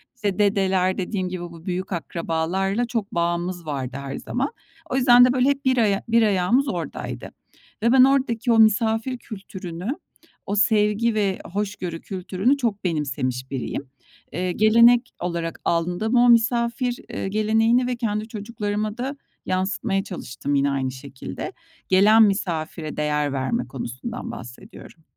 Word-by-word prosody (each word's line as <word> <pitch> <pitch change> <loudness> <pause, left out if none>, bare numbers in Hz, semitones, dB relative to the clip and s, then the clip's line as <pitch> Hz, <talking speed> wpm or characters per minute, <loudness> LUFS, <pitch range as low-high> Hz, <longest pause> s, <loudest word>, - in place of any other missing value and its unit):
işte, 205 -5 -2
dedeler, 190 -2 +2
dediğim 185 0 -2
gibi, 180 -1 -5
bu 170 -1 -10
büyük 185 +1 -3
akrabalarla 175 +6 -1
çok 230 -4 -3
bağımız 175 +1 -1
vardı 135 -4 -4
her 135 0 -5
zaman. 270 +3 -2 0.4
O - - -2
yüzden 245 -2 +7
de, 250 - +2
böyle, 255 +1 +3
hep 280 0 -1
bir 260 -1 +3
aya 205 -4 +2
bir 230 0 +4
ayağımız 210 +6 +2
oradaydı - - -5 0.5
ve 235 - +4
ben 260 0 +7
oradaki 255 -3 +2
o 225 - +4
misafir 225 +3 +3
kültürünü, 190 -5 -8 0.6
o 200 - -2
sevgi 210 +2 +3
ve 200 -3 0
hoşgörü 195 -5 -3
kültürünü 195 +7 0
çok 230 -7 -2
benimsemiş 130 -6 -2
biriyim. 135 +1 -4 0.4
Eee, 180 0 -2
gelenek 235 +4 +5
olarak 170 -1 -3
aldım 175 +4 0
ama 240 +2 +4
o - - +5
misafir, 235 +1 +2
eee, - - -4
geleneğini 225 +4 +2
ve 250 - -1
kendi 215 -2 -2
çocuklarıma 210 -1 -3
da 265 +3 -3 0.3
yansıtmaya 195 +2 -1
çalıştım 145 -6 -4
yine 140 0 +2
aynı 135 -1 -1
şekilde. 135 - -7 0.4
Gelen 210 +4 +6
misafire 170 -6 -1
değer 150 -1 0
verme 135 - -1
konusundan 135 - -6
bahsediyorum. 125 +6 -11
200 Hz, 145 wpm, -23 LUFS, 170-235 Hz, 0.6 s, yüzden